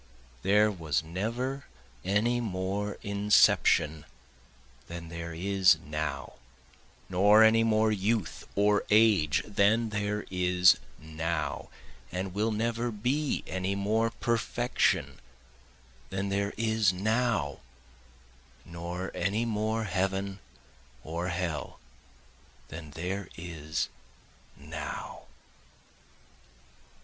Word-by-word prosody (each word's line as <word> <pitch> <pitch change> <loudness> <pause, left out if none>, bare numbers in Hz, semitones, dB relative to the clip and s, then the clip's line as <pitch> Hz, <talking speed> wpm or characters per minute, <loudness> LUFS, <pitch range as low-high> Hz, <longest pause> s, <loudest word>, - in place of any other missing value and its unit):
There 105 +2 +4
was 80 -4 -1
never 115 - -3 0.4
any 105 +6 +1
more 100 0 -2
inception 100 -6 +3 0.8
than 85 -1 -7
there 85 0 -6
is 95 -1 +4
now, 75 +1 -4 0.7
Nor 105 +4 +6
any 115 +1 +5
more 110 -1 +3
youth 105 0 -1
or 105 +1 +3
age 105 -8 +4
than 110 +3 +2
there 105 0 -2
is 90 0 +4 0.2
now, 80 0 -3 0.4
And 90 +1 -3
will 105 +3 +1
never 115 +2 -1
be 125 +7 -1
any 95 +1 -2
more 110 +3 +1
perfection 120 +1 0 0.9
than 95 +1 -2
there 100 +1 -1
is 110 -2 +2
now, 105 - 0 1.1
Nor 85 +2 -5
any 100 +6 0
more 110 0 -1
heaven 95 0 -1 0.6
or 85 +3 -3
hell 85 -6 -3 0.9
than 80 -1 -8
there 90 +6 -4
is 80 -1 -3 0.7
now. 75 +1 -7
100 Hz, 90 wpm, -29 LUFS, 85-110 Hz, 1.1 s, Nor